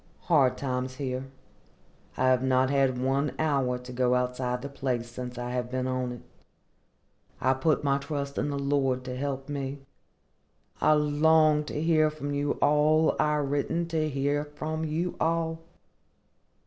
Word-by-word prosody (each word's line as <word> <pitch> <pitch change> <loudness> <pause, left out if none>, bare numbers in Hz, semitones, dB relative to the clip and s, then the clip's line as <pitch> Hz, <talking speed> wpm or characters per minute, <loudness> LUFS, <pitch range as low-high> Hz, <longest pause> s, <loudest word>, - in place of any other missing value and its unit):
Hard 135 -7 +3
times 130 -1 -3
here. 130 -1 -4 0.9
I 130 0 +3
have 130 -1 +3
not 130 0 +2
had 135 -2 +2
one 135 +2 0
hour 135 -5 +1
to 125 0 -10
go 125 0 +2
outside 125 0 -1
the - - -3
place 130 -4 -2
since 125 0 -7
I 120 0 -4
have 125 -1 -2
been 130 0 -2
on 130 -1 -1
it. 120 - -8 1.2
I 130 +1 +3
put 150 +4 +1
my 140 -1 +2
trust 140 -1 -4
in - - -1
the 140 - -2
Lord 140 -2 0
to 125 -1 -5
help 135 0 -3
me. 140 -1 -4 1.0
I 155 - +5
long 150 +1 +4
to 150 - -4
hear 155 -1 +3
from 145 -2 -5
you 145 0 0
all 155 +2 +4
I 150 0 +2
written 145 +4 -1
to 155 -2 0
hear 145 +1 0
from 155 +2 -5
you 165 +3 -2
all. 165 0 0
140 Hz, 160 wpm, -28 LUFS, 130-150 Hz, 1.2 s, I